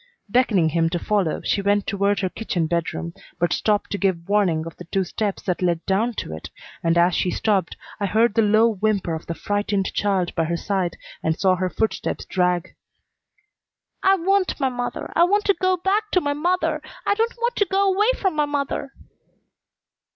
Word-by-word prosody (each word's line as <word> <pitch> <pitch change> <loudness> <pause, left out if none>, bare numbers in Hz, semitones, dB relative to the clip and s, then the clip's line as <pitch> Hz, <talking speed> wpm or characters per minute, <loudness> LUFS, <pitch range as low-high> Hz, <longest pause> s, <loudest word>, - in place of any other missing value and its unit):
Beckoning 200 -7 +3
him 165 +1 +1
to 175 - -1
follow, 190 -3 0
she 200 - 0
went 205 0 +1
toward 200 0 0
her 185 - 0
kitchen 180 -5 -2
bedroom, 170 0 -2 0.2
but 175 - +1
stopped 210 -1 0
to 200 - -2
give 185 -4 0
warning 190 -6 +2
of 165 - -8
the 180 - -10
two 190 +3 0
steps 200 +2 -3
that 180 -1 -2
led 175 -2 0
down 220 +5 +1
to 80 - -4
it, 80 - -9 0.3
and 165 0 +2
as 175 +1 +4
she 180 - +1
stopped 195 -2 0 0.2
I 200 - 0
heard 220 +3 +3
the 225 - +3
low 215 +2 +4
whimper 210 -5 0
of 160 - -6
the 170 - -3
frightened 205 0 -1
child 195 -4 0
by 165 - 0
her 170 +1 -1
side 190 -2 -2 0.2
and 160 0 -1
saw 185 -1 +3
her 185 0 -1
footsteps 220 +4 -2
drag. 180 -2 0 1.3
"I 385 0 +5
want 385 0 +1
my 270 -2 +2
mother! 245 -1 -4
I 340 - +5
want 410 +3 +1
to 400 - +4
go 370 0 +1
back 405 +4 0
to 365 - +5
my 285 -4 -1
mother! 320 0 0 0.2
I - - +3
don't 455 +3 -1
want 475 +1 -1
to 410 - +3
go 390 +1 +2
'way 420 +4 +3
from 380 -5 0
my 300 -1 +2
mother!" 280 -1 -3
205 Hz, 195 wpm, -23 LUFS, 180-290 Hz, 1.3 s, I